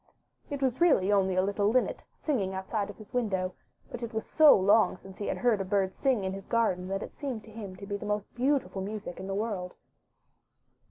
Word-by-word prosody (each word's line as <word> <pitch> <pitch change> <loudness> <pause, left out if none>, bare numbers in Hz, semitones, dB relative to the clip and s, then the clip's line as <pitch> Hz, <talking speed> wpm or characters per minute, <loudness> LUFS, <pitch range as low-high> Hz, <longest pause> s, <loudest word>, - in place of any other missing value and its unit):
It 285 -2 -3
was 260 +3 0
really 240 - +4
only 190 -2 +3
a 185 - +3
little 200 +1 +1
linnet 250 +3 +1
singing 200 -11 -1
outside 200 +2 -2
his 215 - -12
window, 190 -7 0 0.4
but 245 - -6
it 235 -1 -5
was 220 - -2
so 310 -2 +7
long 205 +2 +4
since 190 +1 -13
he 205 - -3
had - - -1
heard 235 -5 +2
a - - 0
bird 190 -1 0
sing 255 -7 +1
in 190 0 -2
his 195 0 -8
garden 200 -6 +1
that 195 +1 -2
it - - -10
seemed 255 -7 -4
to 220 - -14
him 205 -4 -7
to 200 - -9
be 200 0 -3
the 210 - -7
most 210 -1 -2
beautiful 255 -5 0
music 205 -2 -5
in 190 - -6
the 195 - -2
world. 200 -4 -3
205 Hz, 220 wpm, -29 LUFS, 190-235 Hz, 0.4 s, so